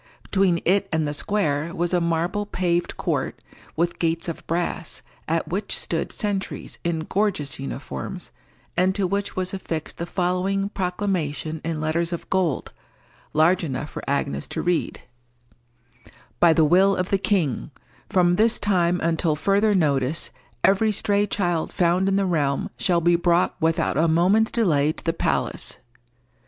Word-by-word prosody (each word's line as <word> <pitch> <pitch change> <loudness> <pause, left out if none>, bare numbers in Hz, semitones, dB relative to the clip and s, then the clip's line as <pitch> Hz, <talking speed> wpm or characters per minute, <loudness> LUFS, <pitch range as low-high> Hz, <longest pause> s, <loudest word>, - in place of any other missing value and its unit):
Between 190 -4 +2
it 195 +3 +2
and 160 -2 +1
the 145 - -2
square 165 -2 -1
was 175 0 -1
a 175 - +3
marble 170 +5 0
paved 175 -3 -1
court, - - -2 0.4
with 170 +2 -1
gates 165 +2 0
of 165 - -5
brass, 170 0 -2 0.2
at 165 0 0
which 190 +5 -2
stood - - -2
sentries 205 -3 -3
in 170 -2 -1
gorgeous 180 -7 -1
uniforms, 135 - -6 0.4
and 185 +2 +2
to 200 -2 +1
which 200 +2 -2
was 185 0 -2
affixed 165 -5 -4
the 170 - -3
following 185 +2 0
proclamation 180 -5 -2
in 165 -1 -2
letters 165 +2 0
of 170 - -5
gold, 180 -7 0 0.6
large 170 +4 +4
enough 150 -1 -4
for - - -6
Agnes 105 - -1
to - - -4
read:— 175 -1 0 1.4
"By 170 - +6
the 160 -1 +4
will 190 +5 +5
of 180 +1 -2
the 195 - +3
King, 180 - 0 0.4
from 175 -1 +3
this 230 +2 +4
time 180 -3 +2
until 165 -1 +1
further 200 +6 +2
notice, 145 -3 +1 0.3
every 205 +3 +4
stray 205 0 +1
child 175 -5 -1
found 180 +2 +2
in 195 - +1
the 195 0 +2
realm 145 -6 0
shall 175 -2 +1
be 175 +1 +4
brought 175 +1 +2
without 160 -2 +1
a 165 - +4
moment's 185 +7 +3
delay 155 -10 +2
to - - -12
the 165 - 0
palace. - - -1
175 Hz, 155 wpm, -24 LUFS, 160-195 Hz, 1.4 s, By